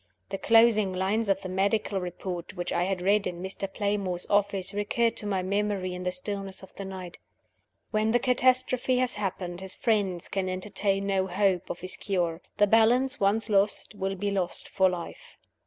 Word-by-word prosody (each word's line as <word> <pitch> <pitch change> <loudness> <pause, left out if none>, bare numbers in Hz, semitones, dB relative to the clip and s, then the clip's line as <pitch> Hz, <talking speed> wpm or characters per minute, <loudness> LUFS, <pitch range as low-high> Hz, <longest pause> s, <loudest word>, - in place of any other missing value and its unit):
The 195 - -4
closing 225 -4 +4
lines 200 +4 0
of 195 0 +2
the - - -4
medical 195 +1 0
report 180 0 -6
which 175 -1 -3
I 175 - +1
had 190 -1 -2
read 200 +2 +3
in 175 - -5
Mr. 195 +1 -5
Playmore's 200 -4 -1
office 200 -1 +1
recurred 225 +3 +1
to 210 - -3
my 190 -2 0
memory 200 -1 -1
in 180 - -6
the 180 0 -1
stillness 195 +1 -5
of 190 - -13
the 195 - -6
night 185 -2 -8 0.7
"When 215 0 +1
the 235 - +4
catastrophe 255 0 +2
has 250 -1 +1
happened, 185 -3 -4
his 190 -1 -2
friends 200 -6 0
can 190 -2 -2
entertain 195 +1 +1
no 190 -1 +1
hope 190 -1 +1
of - - -5
his 185 +1 0
cure: 175 -4 -1 0.2
the 205 - +6
balance 235 +5 +3
once 205 +2 +2
lost, 205 0 +2
will 195 -1 -3
be 200 +2 -2
lost 185 -3 -1
for 190 -1 +3
life." 175 -2 -7
195 Hz, 185 wpm, -27 LUFS, 185-210 Hz, 0.7 s, the